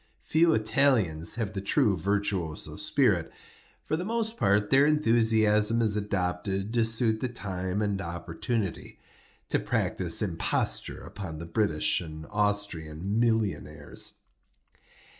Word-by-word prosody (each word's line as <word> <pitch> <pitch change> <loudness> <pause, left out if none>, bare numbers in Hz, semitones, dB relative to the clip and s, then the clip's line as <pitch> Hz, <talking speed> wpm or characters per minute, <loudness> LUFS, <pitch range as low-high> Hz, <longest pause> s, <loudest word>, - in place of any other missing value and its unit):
Few 165 +1 +3
Italians 110 - +2
have 110 -3 -3
the 95 - -4
true 100 0 +2
virtuoso 95 -3 -2
spirit. - - +1 0.5
For - - 0
the 170 - -2
most 225 +2 -1
part 105 - +1
their 135 +1 +6
enthusiasm 115 -5 +3
is 110 -3 +1
adopted 95 0 -2
to 115 -1 +3
suit 115 -1 +2
the 130 - -2
time 95 -3 -3
and 100 -1 -1
opportunity—to 85 +4 -5
practise - - +1
imposture - - -1
upon 85 -6 -7
the 85 - -7
British 85 -3 +1
and 80 -2 -8
Austrian 100 -3 -1
millionaires. 105 -10 -1
105 Hz, 115 wpm, -28 LUFS, 90-115 Hz, 0.5 s, their